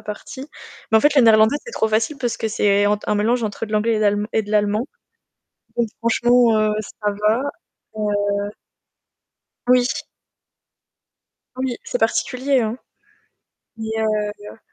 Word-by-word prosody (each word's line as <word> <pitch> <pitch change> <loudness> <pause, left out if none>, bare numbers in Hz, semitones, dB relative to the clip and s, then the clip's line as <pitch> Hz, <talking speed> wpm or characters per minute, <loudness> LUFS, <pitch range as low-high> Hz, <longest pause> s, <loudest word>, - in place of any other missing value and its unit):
partie. 260 +6 -8 0.5
Mais - - +7
en - - 0
fait, 295 +3 +3
le 270 - +7
néerlandais 220 +3 +5
c'est 475 - -9
trop 220 - 0
facile 220 +7 0
parce 245 -3 -2
que 225 - -3
c'est 205 -2 +2
entre 210 0 -1
un 210 - +2
mélange 230 +3 +1
entre 215 +1 -3
de 215 - -9
l'anglais 215 +1 +1 0.3
et 220 - +1
de 205 - -10
l'allemand 210 +2 +1 0.9
donc 235 -2 +1
franchement 235 0 +3
heu 215 0 +2
ça 210 0 -4 0.2
va. 225 +5 +3 0.5
Heu 205 -1 -1 1.2
Oui. 250 -1 +5 1.7
Oui, 255 -2 -2
c'est 245 - -3
particulier 255 +4 +1
hein, 225 +2 -3 1.0
mais 220 0 -5
heu 210 -1 -2
220 Hz, 140 wpm, -21 LUFS, 210-240 Hz, 1.7 s, Mais